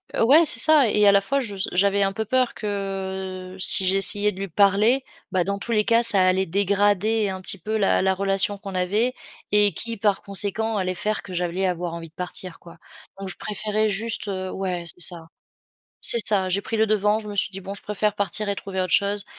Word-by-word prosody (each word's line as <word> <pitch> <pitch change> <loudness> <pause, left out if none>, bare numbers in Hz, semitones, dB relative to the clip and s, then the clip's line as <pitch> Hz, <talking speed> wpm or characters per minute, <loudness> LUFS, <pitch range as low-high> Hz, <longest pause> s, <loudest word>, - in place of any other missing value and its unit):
Heu, - - +1
ouais, 295 +8 +5
c'est 230 - +4
ça 295 -4 +5
et 210 0 +2
à - - +7
la 200 0 +3
fois 275 +7 -2
je 210 -6 -6
s 190 - -3
j'avais 200 +2 +1
un 195 0 -1
peu 220 +2 -4
peur 255 +2 -1
que 190 -2 -6
si 190 +1 +8
j'essayais 200 +2 +5
de 190 - -12
lui 195 - -5
parler, 205 +8 +2 0.3
bah, 185 -2 0
dans 200 +2 -4
tous 235 - -6
les 210 -2 +1
cas, 230 0 +3
ça 200 -5 +4
allait 190 +1 +1
dégrader 205 +3 0
un 190 0 -6
petit 190 +1 +1
peu 215 +5 -4
la 195 -2 +1
la 190 0 +1
relation 195 +1 +1
qu'on 195 -2 -10
avait 210 +8 -1 0.4
et 205 -1 +3
qui, 230 -1 -5
par 205 -1 -1
conséquent, 205 +2 -1
allait 185 -1 -3
faire 215 +4 -3
que 185 - -11
j'allais 180 +2 -3
avoir 175 -1 -4
envie 165 -1 -9
de - - -38
partir, 180 -1 -5
quoi, 170 -1 -16 0.4
donc, 195 -1 -7
je - - -5
préférais 215 +1 -2
juste, 220 +2 -3
heu, 185 -1 -5
ouais, 180 -3 -5
c'est 175 - -1
ça, 165 -2 -2 0.7
c'est 235 - +4
ça, 195 -3 +3
j'ai 200 +2 0
pris 225 +2 -5
le 220 0 +1
devant, 210 0 0
je 210 - -11
me 205 - -7
suis 195 - +1
dit: 195 0 -8
«Bon, 195 +1 -8
je 200 - -9
préfère 210 0 -2
partir 205 +1 -2
et - - -1
trouver 190 -1 -6
autre 185 - -4
chose 200 0 +1
200 Hz, 230 wpm, -22 LUFS, 190-215 Hz, 0.7 s, si